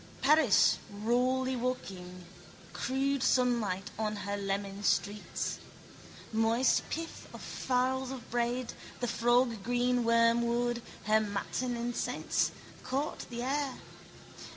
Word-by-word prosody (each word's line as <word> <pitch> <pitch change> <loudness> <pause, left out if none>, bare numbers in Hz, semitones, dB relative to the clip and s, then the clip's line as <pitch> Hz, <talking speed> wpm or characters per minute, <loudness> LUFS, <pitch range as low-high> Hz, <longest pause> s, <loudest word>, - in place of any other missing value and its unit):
Paris 290 -5 +5
rawly 250 +5 +1
waking, 185 -8 -4 0.5
crude 275 +1 0
sunlight 235 -8 +1
on 215 -1 0
her 205 0 -3
lemon 200 0 -3
streets. 205 0 0 0.7
Moist 225 +3 +3
pith 330 +1 -5
of - - -8
farls 260 0 0
of 260 -3 -7
bread, 240 +1 -1 0.3
the 245 - -1
froggreen 245 +1 +2
wormwood, 235 +1 +3 0.2
her 215 0 +4
matin 220 +4 -2
incense, 240 +1 0 0.3
court 275 +4 -2
the 240 -1 -4
air. 275 0 -1
240 Hz, 100 wpm, -31 LUFS, 215-255 Hz, 0.7 s, Paris